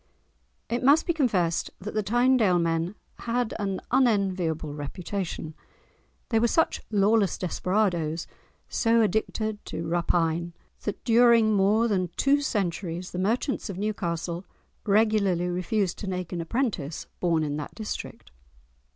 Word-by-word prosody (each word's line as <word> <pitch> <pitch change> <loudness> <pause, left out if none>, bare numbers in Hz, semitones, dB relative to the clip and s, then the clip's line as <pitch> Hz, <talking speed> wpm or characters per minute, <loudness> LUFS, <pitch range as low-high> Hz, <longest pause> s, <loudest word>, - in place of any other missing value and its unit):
It 240 +1 -1
must 285 +5 +5
be 340 - +1
confessed 190 - +1
that 205 +3 -6
the 215 - +1
Tynedale 235 -2 +3
men 165 +3 0 0.2
had 240 -1 -1
an 195 -2 -2
unenviable 190 - +1
reputation. 165 +2 -5 0.8
They 225 - +3
were 235 - +3
such 325 +7 +1
lawless 205 -1 +3
desperadoes, 175 -3 0 0.4
so 230 0 +3
addicted 215 +1 -1
to 165 - -5
rapine, 170 0 0 0.3
that 205 - -4
during 230 -2 +5
more 210 +4 +3
than 185 -5 0
two 285 +1 +3
centuries 180 -6 -2
the 180 - -4
merchants 230 +5 -1
of 190 - -5
Newcastle 175 -4 -2 0.4
regularly 200 -4 +3
refused 185 +2 -1
to 205 - -5
take 180 -1 -4
an 170 - -2
apprentice 170 - -2
born 165 -3 +1
in 145 -1 -2
that 150 - -6
district. 215 - -6
195 Hz, 130 wpm, -26 LUFS, 170-225 Hz, 0.8 s, must